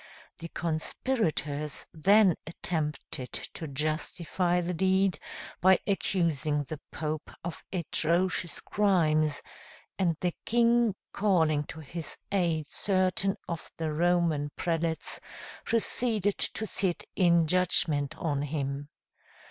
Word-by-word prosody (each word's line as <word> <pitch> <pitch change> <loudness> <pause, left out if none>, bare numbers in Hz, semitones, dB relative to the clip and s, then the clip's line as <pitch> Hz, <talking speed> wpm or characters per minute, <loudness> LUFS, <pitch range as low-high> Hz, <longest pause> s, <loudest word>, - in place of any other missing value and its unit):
The 165 - -6
conspirators 155 - -2
then 195 +2 +5
attempted 150 -6 -3
to 160 - -5
justify 160 +5 0
the 175 +1 -2
deed, 190 0 +2 0.4
by 190 +1 +6
accusing 160 -7 0
the 150 +1 -6
Pope 155 -1 -4
of 170 0 -6
atrocious 175 0 0
crimes; 155 -7 +2 0.6
and 170 -4 +2
the 180 -1 0
king 235 -2 +3 0.2
calling 160 -8 +2
to 160 - -8
his 160 +2 -5
aid 170 -6 +1
certain 190 +2 +1
of 170 -2 -5
the 160 -2 -2
Roman 165 -3 +2
prelates, 165 -1 -1 0.5
proceeded 225 -3 +2
to 220 - 0
sit 190 -4 +1
in 170 -3 +4
judgment 160 -4 +2
on 145 -4 -1
him. 145 -1 -3
170 Hz, 105 wpm, -29 LUFS, 155-190 Hz, 0.6 s, by